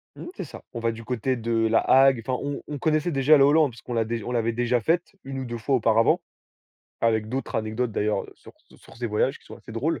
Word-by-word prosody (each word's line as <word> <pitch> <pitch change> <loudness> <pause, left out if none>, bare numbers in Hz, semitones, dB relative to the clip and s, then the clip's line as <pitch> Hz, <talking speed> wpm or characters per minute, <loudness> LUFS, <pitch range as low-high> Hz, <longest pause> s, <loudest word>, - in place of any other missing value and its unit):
mmh, - - -9
c'est - - -5
ça. 150 - -11
On 120 - -4
va 115 0 0
du 115 0 -9
côté 125 +2 -1
de 115 0 -4 0.2
La 115 0 +4
Hague, 135 -2 +5
enfin 130 -1 -1
on 145 0 -4
on 145 - -5
connaissait 155 +3 +1
déjà 140 +2 +5
le 135 - +5
Hollande 145 -1 +4
puisqu'on 120 +1 -9
l'a 115 -1 +1
déj 115 -1 -3
on 125 - -5
l'avait 115 -1 0
déjà 120 +1 +1
faite. 170 - 0
Une 135 0 -5
ou 130 - -4
2 120 0 -5
fois 130 +4 0
auparavant, 115 -1 +3 0.8
avec 110 -2 +1
d'autres 130 +3 -4
anecdotes 110 +2 -2
d'ailleurs 105 +1 -1
sur - - -16 0.2
sur - - -17
ces 120 0 -3
voyages 115 +6 0
qui - - -26
sont - - -11
assez 115 - -13
drôles. 145 +9 -1
120 Hz, 245 wpm, -25 LUFS, 115-135 Hz, 0.8 s, Hague